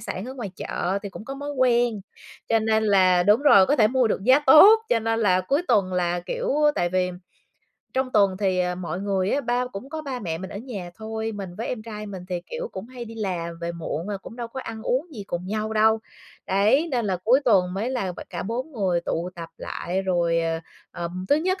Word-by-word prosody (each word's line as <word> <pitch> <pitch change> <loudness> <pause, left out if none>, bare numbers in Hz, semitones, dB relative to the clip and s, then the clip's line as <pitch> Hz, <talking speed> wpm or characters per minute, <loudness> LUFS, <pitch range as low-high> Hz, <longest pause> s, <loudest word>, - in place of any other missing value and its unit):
sản 185 - -5
ở 260 - -7
ngoài 235 -7 -5
chợ 190 +3 -2
thì 200 - -5
cũng 215 - -10
có 270 - -6
mối 285 +1 -5
quen, 240 -4 +2 0.5
cho 225 - +4
nên 220 0 +1
là 185 -3 +4
đúng 210 +8 +4
rồi, 200 -10 +7
có 290 - +2
thể 215 - +5
mua 255 -1 +2
được 195 - -1
giá 260 +3 +6
tốt, 395 +11 +9
cho 235 - +3
nên 225 +1 0
là 185 -4 +3
cuối 275 - 0
tuần 200 -6 +2
là, 175 -1 0
kiểu, 195 - -2 0.2
tại 175 - +1
vì 180 0 0 0.8
trong 260 -1 -1
tuần 200 -3 +3
thì, 190 -2 +1
ờ, 180 0 0
mọi 180 -1 -5
người 195 -1 0
á 285 - +1
ba 245 -1 0
cũng 225 +8 -7
có 315 0 -5
ba 270 -3 -4
mẹ 165 -4 -3
mình 190 - -7
ở - - -7
nhà 205 -7 -7
thôi, 220 0 -4
mình 200 -3 -6
với 230 - -3
em 230 -4 -4
trai 215 -1 -7
mình 190 -3 -7
thì, 180 -2 -2
kiểu, 485 0 -4
cũng 190 - -7
hay 250 -1 -8
đi 225 0 -10
làm 175 -6 -3
về 170 0 -3
muộn 170 +1 -4
rồi 205 -1 -3
cũng 225 - -11
đâu 240 -2 -5
có 260 +3 -6
ăn 225 -2 -7
uống 260 +8 0
gì 205 -4 -7
cùng 175 0 -4
nhau 215 +2 -2
đâu. 220 +1 +4 0.5
Đấy, 215 - +3
nên 245 -3 0
là 185 -2 0
cuối 250 +5 +5
tuần 185 -7 +3
mới 215 +6 -2
là 200 -8 -2
b - - -10
cả 175 - -4
4 250 +9 -4
người 190 -8 0
tụ 170 +1 -3
tập 170 -1 -7
lại 185 +2 -3
rồi, 170 -3 +1
ờ, 165 0 -1 0.3
ờm, 175 +2 -5
thứ 290 - +5
nhất 370 +5 0
210 Hz, 240 wpm, -24 LUFS, 185-245 Hz, 0.8 s, tốt